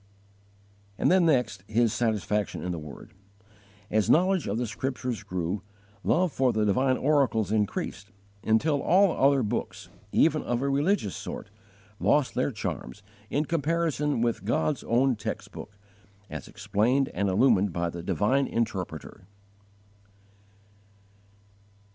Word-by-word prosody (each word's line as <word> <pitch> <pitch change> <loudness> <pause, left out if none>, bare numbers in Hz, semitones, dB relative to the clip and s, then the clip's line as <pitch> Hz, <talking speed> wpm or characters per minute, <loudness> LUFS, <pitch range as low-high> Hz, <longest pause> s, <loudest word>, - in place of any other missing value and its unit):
8. - - +2 0.6
His 115 0 +2
satisfaction 105 -3 -1
in 90 - -2
the 85 - -4
Word. 75 -2 -11 0.8
As 110 -1 +2
knowledge 185 0 +3
of 100 - -1
the 120 - -1
Scriptures 125 +1 -3
grew, 90 -1 -3 0.4
love 180 0 +2
for 130 -2 +2
the 110 -1 +1
divine 130 +6 +2
oracles 130 - +2
increased, 105 -1 -2 0.3
until 140 +7 +2
all 190 +1 +4
other 135 -3 +3
books, 110 +3 -4 0.2
even - - +3
of 120 +1 -2
a 140 - +1
religious 140 - +1
sort, - - -7 0.5
lost - - +2
their - - 0
charms 100 +11 -5 0.3
in 150 +2 0
comparison 155 -3 0
with 115 -5 0
God's 150 +5 0
own 125 +2 +2
text 105 -1 -5
book, 100 -1 -10 0.5
as 75 -4 -6
explained 125 +7 0
and 100 +2 0
illumined 105 -1 +3
by 85 0 -2
the 85 - -6
divine 105 - +1
Interpreter. 105 -6 -4
115 Hz, 125 wpm, -27 LUFS, 100-140 Hz, 0.8 s, all